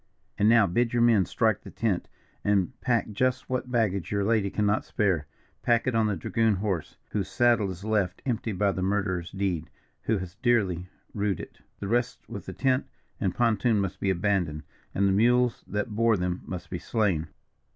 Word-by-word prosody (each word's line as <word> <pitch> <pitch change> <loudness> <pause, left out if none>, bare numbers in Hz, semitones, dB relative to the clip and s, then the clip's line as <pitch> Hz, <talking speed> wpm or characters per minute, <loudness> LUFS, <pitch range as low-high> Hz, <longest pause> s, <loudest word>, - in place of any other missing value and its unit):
"And 105 - +5
now 115 -2 +6
bid 115 +6 +1
your 120 - +2
men 110 -6 +5
strike 110 -3 +1
the - - -10
tent, 105 -6 -1 0.4
and 100 -3 +2
pack 120 -3 +1
just 130 +4 0
what 130 0 -1
baggage 105 -7 0
your 100 -1 +1
lady 105 -1 +2
cannot 105 +1 +1
spare. 90 -9 0 0.3
Pack 120 -1 +2
it 130 - +1
on 110 -1 +3
the 105 - 0
dragoon 110 +5 +1
horse, 95 -5 -3
whose 100 -3 -1
saddle 120 -5 +3
is 95 0 -7
left 105 -4 0
empty 115 -3 -1
by 100 +1 +1
that 95 - -4
murderer's 95 -3 -1
deed, 90 -5 -2 0.3
who 110 - +1
has 90 -2 -6
dearly 95 -8 +1 0.2
rued 100 -3 -1
it. - - -10 0.2
The 100 - -4
rest 120 +3 -1
with - - -8
the - - -5
tent 130 0 +1 0.3
and 95 -3 -1
pontoon 115 -2 +2
must 95 -2 -2
be 100 - 0
abandoned, 90 -5 0 0.3
and 100 +1 +3
the - - +3
mules 120 +4 +3
that 105 +2 -2
bore 115 -1 +3
them 90 0 -2
must 90 -2 -7
be 90 - -3
slain. 95 -9 0
105 Hz, 190 wpm, -27 LUFS, 95-115 Hz, 0.4 s, now